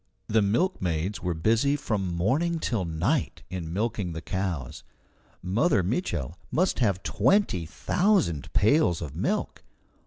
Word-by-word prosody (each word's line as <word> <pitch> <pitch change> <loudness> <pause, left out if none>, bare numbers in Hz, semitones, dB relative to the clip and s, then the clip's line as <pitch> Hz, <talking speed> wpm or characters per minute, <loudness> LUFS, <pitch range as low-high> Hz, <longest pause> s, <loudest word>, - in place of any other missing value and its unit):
The 110 0 +2
milkmaids 100 - 0
were 90 -2 -1
busy 115 - +2
from 100 -9 -2
morning 145 - +1
till 115 - -1
night 85 - -1
in 85 -3 -4
milking 100 -2 -2
the 80 - -5
cows. 90 -9 -3 0.6
Mother 100 - +2
Mitchel 85 - -2 0.2
must 185 +4 +1
have 100 -6 +1
twenty 105 - +2
thousand 175 - +1
pails 105 - +3
of 75 - -7
milk. - - -2
100 Hz, 125 wpm, -27 LUFS, 85-135 Hz, 0.6 s, pails